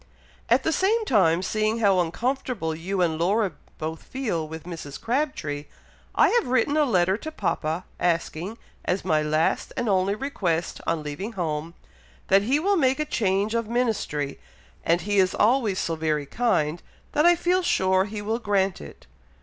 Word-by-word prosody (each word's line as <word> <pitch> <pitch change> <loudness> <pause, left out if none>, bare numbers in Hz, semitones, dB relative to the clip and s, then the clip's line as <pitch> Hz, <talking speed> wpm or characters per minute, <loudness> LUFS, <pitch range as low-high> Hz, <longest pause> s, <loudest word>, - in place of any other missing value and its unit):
At - - +4
the 320 - +1
same 430 +7 +2
time, 185 - +3
seeing 215 +3 0
how 200 -5 +3
uncomfortable 230 0 -1
you 180 +4 -1
and 160 -2 0
Laura 200 +3 +2 0.3
both 160 +1 -4
feel 210 -12 -3
with 160 0 -8
Mrs. 165 -5 -7
Crabtree, 230 - -2 0.5
I - - +5
have 475 -1 +2
written 255 +3 +2
a 305 -1 +4
letter 190 -5 +2
to 315 +7 -7
papa, 165 - -2
asking, 175 +4 -1 0.3
as 180 +1 -1
my 155 -4 +2
last 155 +1 0
and 240 - -1
only 195 0 +2
request 185 - -2
on 165 -2 0
leaving 170 +10 -5
home, 165 -3 -3 0.5
that 195 +1 +6
he 260 +8 +2
will 395 +4 +2
make 270 -2 +2
a 305 - 0
change 205 -4 0
of 230 -2 -1
ministry, 215 - -1 0.4
and 170 +1 +2
he 205 -1 +1
is 185 -1 +3
always 220 -3 +2
so 165 - -1
very 155 -2 -1
kind, 170 - 0 0.3
that 300 +3 +4
I 350 - +7
feel 355 +2 +1
sure 190 - +2
he 210 0 -6
will 220 +3 -1
grant 195 -4 0
it." 70 - -12
195 Hz, 170 wpm, -25 LUFS, 165-240 Hz, 0.5 s, I